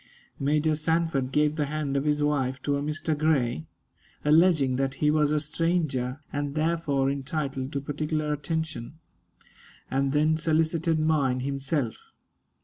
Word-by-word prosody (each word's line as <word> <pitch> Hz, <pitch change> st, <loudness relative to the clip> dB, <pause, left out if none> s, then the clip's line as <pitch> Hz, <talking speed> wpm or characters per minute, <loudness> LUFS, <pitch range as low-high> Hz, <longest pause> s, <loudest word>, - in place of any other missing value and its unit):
Major 150 Hz, +2 st, +2 dB
Sanford 160 Hz, -4 st, 0 dB
gave 150 Hz, +1 st, +2 dB
the 150 Hz, -2 st, 0 dB
hand 150 Hz, -2 st, -2 dB
of 140 Hz, +1 st, 0 dB
his 150 Hz, 0 st, +1 dB
wife 135 Hz, -3 st, 0 dB
to 145 Hz, -, +1 dB
a 140 Hz, -, -1 dB
Mr. 155 Hz, +1 st, -1 dB
Grey, 140 Hz, -, +1 dB, 0.6 s
alleging 150 Hz, -4 st, +4 dB
that 135 Hz, 0 st, -1 dB
he 150 Hz, +2 st, +2 dB
was 150 Hz, -1 st, +3 dB
a 150 Hz, 0 st, +2 dB
stranger, 150 Hz, -4 st, -1 dB
and 145 Hz, 0 st, -2 dB
therefore 155 Hz, -4 st, +1 dB
entitled 140 Hz, -1 st, -3 dB
to 140 Hz, -, -1 dB
particular 150 Hz, +1 st, -2 dB
attention, 160 Hz, -3 st, -4 dB, 1.0 s
and 135 Hz, +1 st, +1 dB
then 155 Hz, +2 st, +3 dB
solicited 160 Hz, 0 st, +1 dB
mine 145 Hz, -5 st, +1 dB
himself. 135 Hz, -2 st, -1 dB
150 Hz, 140 wpm, -27 LUFS, 135-155 Hz, 1.0 s, alleging